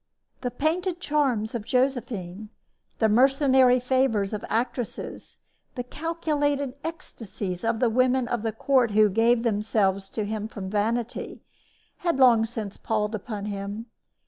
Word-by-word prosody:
The 250 - -1
painted 340 +7 -1
charms 265 -10 0
of 235 -3 -3
Josephine, 220 -6 -1 0.5
the 220 - +3
mercenary 260 +2 +4
favors 250 -5 +1
of 210 - -4
actresses, 240 +1 -3 0.4
the 245 - -3
calculated 290 -2 -1
ecstasies 225 - -6
of 225 0 0
the 245 - +3
women 255 +1 +2
of 240 -2 -1
the 225 0 -1
court 250 +2 +2
who 215 -1 +6
gave 230 +3 +3
themselves 205 -3 0
to 215 0 -3
him 215 0 -3
from 195 -4 -7
vanity, 225 +3 -2 0.5
had 340 -4 0
long 235 -4 +5
since 220 -3 -6
palled 215 -1 -1
upon 210 -1 -5
him. 205 +2 -5
235 Hz, 135 wpm, -26 LUFS, 210-260 Hz, 0.5 s, who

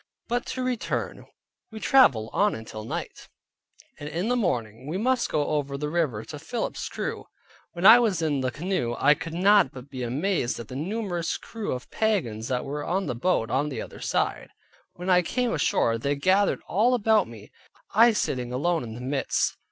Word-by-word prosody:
But 245 +1 -1
to 255 0 -3
return, 250 -2 -3 0.4
we 220 - -7
traveled 125 - +4
on 110 0 +1
till 110 -1 -8
night; 110 - -6 0.7
and 145 - -6
in 175 +8 -2
the 250 - +2
morning, 125 - -2
we 165 +5 -2
must 250 +4 +1
go 150 -1 0
over 140 -2 -1
the 150 +1 -3
river 150 -11 -1
to 150 - -8
Philip's 225 +10 -4
crew. - - -4 0.5
When 175 +1 -3
I 225 +4 +10
was 215 -8 +1
in 150 -4 0
the 130 - 0
canoe 150 -4 -2
I 145 +2 +5
could 165 +2 -7
not 195 -4 +5
but 130 +2 -11
be 130 -2 -6
amazed 130 +2 -1
at 115 - -8
the 130 - -7
numerous 175 +1 -2
crew 225 -2 -6
of 125 0 -7
pagans 135 - 0
that 125 0 -1
were 145 +1 -4
on 190 +4 -1
the 140 - -2
bank 120 -2 0
on 145 +3 +1
the 135 - -4
other - - -11
side. - - -1 0.4
When 180 +1 -8
I 180 0 +6
came 245 +7 -1
ashore, 115 -6 +1
they 140 +4 0
gathered 190 +7 +2
all 235 +6 +3
about 220 -2 +3
me, 110 -3 -12 0.4
I 230 +2 +6
sitting 125 - -2
alone 165 +7 0
in 110 -3 -7
the 120 - -8
midst. 135 +2 0
155 Hz, 190 wpm, -26 LUFS, 125-205 Hz, 0.7 s, I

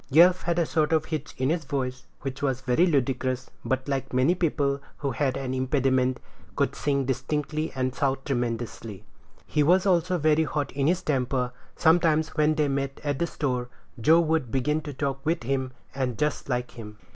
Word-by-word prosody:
Yelf 175 +5 +6
had 170 0 -1
a 170 - +3
sort 155 0 +1
of 155 -1 +2
hitch 155 -2 -5
in 130 +3 +1
his 165 -1 -1
voice, 130 -3 -3
which 135 0 -5
was 135 -2 0
very 135 +7 +3
ludicrous, 130 -4 0
but, 130 +1 -1
like 135 -2 -2
many 130 +7 +3
people 145 -5 0 0.2
who 140 -2 -2
have 130 +1 0
an 130 -1 -3
impediment, 130 -1 +1 0.4
could - - 0
sing 140 -2 0
distinctly 150 +4 -2
and 130 -1 -1
shout 135 0 -1
tremendously; 115 -5 -3 0.4
he 150 - 0
was 180 +5 +4
also 180 -1 +2
very 155 0 +3
hot 145 -1 -2
in 135 +1 0
his 180 +2 +1
temper. 125 -3 0 0.2
Sometimes, 160 -1 +3
when 155 0 +2
they 150 -1 +2
met 135 0 -2
at 145 -2 -1
the 170 - +1
store, 125 -6 -2 0.3
Joe 160 +9 +5
would 160 -6 0
begin 150 +5 +1
to 145 -2 -7
talk 135 -1 -2
with 160 -4 0
him, 130 +1 -1 0.2
and 130 -4 -2
just 150 +1 -1
like 125 -1 -1
him. 105 -2 -10
140 Hz, 185 wpm, -26 LUFS, 130-155 Hz, 0.4 s, Yelf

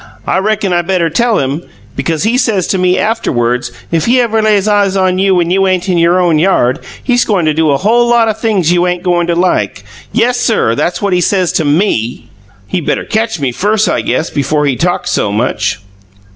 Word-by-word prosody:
I 185 - 0
reckon 205 -1 -1
I 175 - +2
better 175 -2 -1
tell 230 +6 +1
him, 140 +4 -2 0.3
because 165 0 -2
he 225 +3 +1
says 215 -8 +1
to 190 - 0
me 180 0 +2
after 225 +2 -1
WERDS 125 0 -1 0.2
if 165 +3 0
he 250 +2 +3
ever 225 -2 +1
lays 210 -2 +2
eyes 200 -2 +2
on 185 -1 +1
you 195 0 +2
when 175 -1 0
you 195 +1 +2
ain't 185 -1 0
in 175 -2 +1
your 170 +2 +3
own 170 -4 +2
yard, 145 -8 +1 0.2
he's 245 -2 +2
goin' 195 -6 0
to 155 - +2
do 160 0 +1
a 140 - +2
whole 235 +7 +2
lot 235 -1 +3
o' 220 - +1
things 210 -6 0
you 175 0 +2
ain't 180 0 -2
goin' 175 -1 +1
to 170 - 0
like! 135 - 0 0.3
Yessir, 235 - +1
that's 175 - -2
what 200 -2 0
he 180 - +2
says 185 -1 +1
to 160 - -1
ME!" 145 - -1 0.3
"He 175 - -3
better - - -2
catch 220 -3 -2
me 135 -3 -1
first, 210 - 0
I - - 0
guess, 165 - -2
before 150 +1 0
he 140 -3 +1
talks 175 +6 -1
so 100 - 0
much." 105 -2 -1
180 Hz, 220 wpm, -12 LUFS, 160-210 Hz, 0.3 s, he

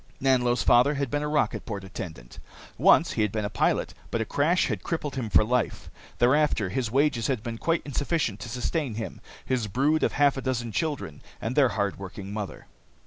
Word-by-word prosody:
Nanlo's 125 -2 +2
father 125 +5 +5
had 140 -3 -2
been 145 - 0
a 150 - -2
rocket 150 -7 0
port 100 -3 -5
attendant. 80 -10 -8 0.4
Once - - +5
he - - -1
had 105 -2 +1
been 110 -1 -2
a 105 - -4
pilot, 95 - +1 0.2
but 115 - -1
a 115 - 0
crash 160 - +2
had - - -2
crippled 150 -4 -3
him 120 -5 -3
for 110 - +5
life. 125 +2 -1 0.3
Thereafter, 125 -5 +3
his 120 +4 -1
wages 135 -1 +2
had 125 -6 -1
been 115 -2 -5
quite 165 0 0
insufficient 145 - -1
to 115 - -7
sustain 125 +2 -2
him, 110 0 -6 0.2
his 125 -4 0
brood 140 +10 +1
of - - +1
half 145 -1 +3
a - - -2
dozen 120 -3 -2
children, 145 - -3 0.2
and 115 +4 -3
their 140 -4 +5
hard 100 -3 -2
working 100 +1 -7
mother. 105 -2 -5
125 Hz, 200 wpm, -26 LUFS, 105-145 Hz, 0.4 s, father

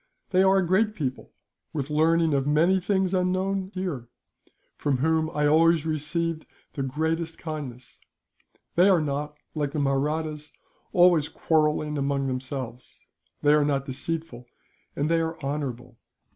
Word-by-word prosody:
They 185 -1 +4
are 190 0 +5
a 190 - +2
great 210 +5 +2
people, 130 -7 -4 0.4
with 145 -1 -3
learning 160 +1 +3
of 135 0 +1
many 165 +6 +3
things 190 0 0
unknown 185 +1 0
here, 170 -11 -3 0.7
from 140 -3 0
whom 160 +3 +1
I 150 -2 0
always 160 +1 +4
received 160 +1 -2 0.3
the 140 - -4
greatest 160 +4 -2
kindness. 140 -7 -7 0.7
They 180 +3 +5
are 185 -3 +5
not, 150 0 -3 0.2
like 145 -2 -2
the 150 - -1
Mahrattas, 150 +2 -1 0.4
always 175 -4 +4
quarrelling 150 -1 +1
among 140 0 0
themselves; 130 -2 -6 0.3
they 145 0 +5
are 150 -1 +4
not 140 -2 0
deceitful, 135 -2 -5 0.5
and 145 - 0
they 165 +1 +2
are 165 0 -3
honourable. 125 -4 -4
155 Hz, 140 wpm, -26 LUFS, 140-165 Hz, 0.7 s, are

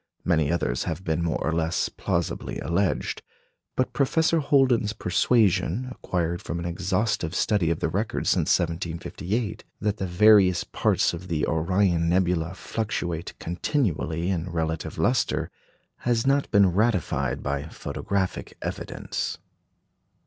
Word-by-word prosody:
Many 80 -4 +2
others 65 -8 0
have 95 - -3
been 80 -2 0
more 85 - 0
or 80 - -1
less 80 +1 0
plausibly - - -2
alleged; 90 +3 -1 0.5
but 130 - 0
Professor 160 +4 +2
Holden's 130 -7 +3
persuasion, 100 +2 +2
acquired 85 -7 -2
from 85 - -4
an 85 - -4
exhaustive 90 0 -1
study 100 -4 +2
of 85 - -1
the - - +2
records - - -1
since - - +1
1758, 90 +6 -3 0.2
that 105 0 -1
the 95 - -2
various 95 -1 +5
parts - - +1
of 85 +2 -7
the 80 -4 0
Orion 85 +1 +1
nebula 90 -1 +1
fluctuate 90 -6 -3
continually 85 - -1
in 90 -1 -2
relative 80 -2 -3
lustre, - - +1 0.5
has 120 -1 0
not 140 +1 +2
been 100 -4 +4
ratified 90 - 0
by 70 +1 -2
photographic 95 +3 -3
evidence. - - -4
90 Hz, 125 wpm, -25 LUFS, 85-105 Hz, 0.5 s, various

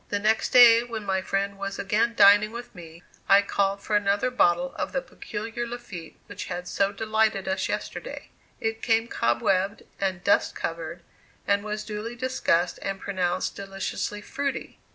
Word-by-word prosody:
The 205 - 0
next 215 +2 +1
day 235 -2 +8
when 230 -3 -6
my 190 -1 0
friend 195 +1 -2
was 195 0 -4
again 220 +4 +1
dining 205 +1 +6
with 240 +1 -8
me 170 -2 -12 0.3
I 200 +1 +7
called 200 0 0
for 210 - -1
another 205 +4 +2
bottle 175 -7 +2
of - - -3
the - - 0
peculiar 225 - -5
Lafitte 205 -9 -8
which - - -7
had 180 0 -5
so 195 0 +1
delighted 220 -1 0
us 190 - -1
yesterday. - - -5 0.3
It 225 -1 -2
came 225 0 +2
cobwebbed 185 - 0 0.2
and 190 -2 -2
dust 200 - +2
covered 165 +1 -5 0.4
and 200 0 +2
was 210 0 -4
duly 215 +2 -5
discussed 235 -9 0
and 195 0 -3
pronounced 185 -2 -1
deliciously 195 +1 -4
"fruity." 280 +5 -4
200 Hz, 160 wpm, -26 LUFS, 190-225 Hz, 0.4 s, day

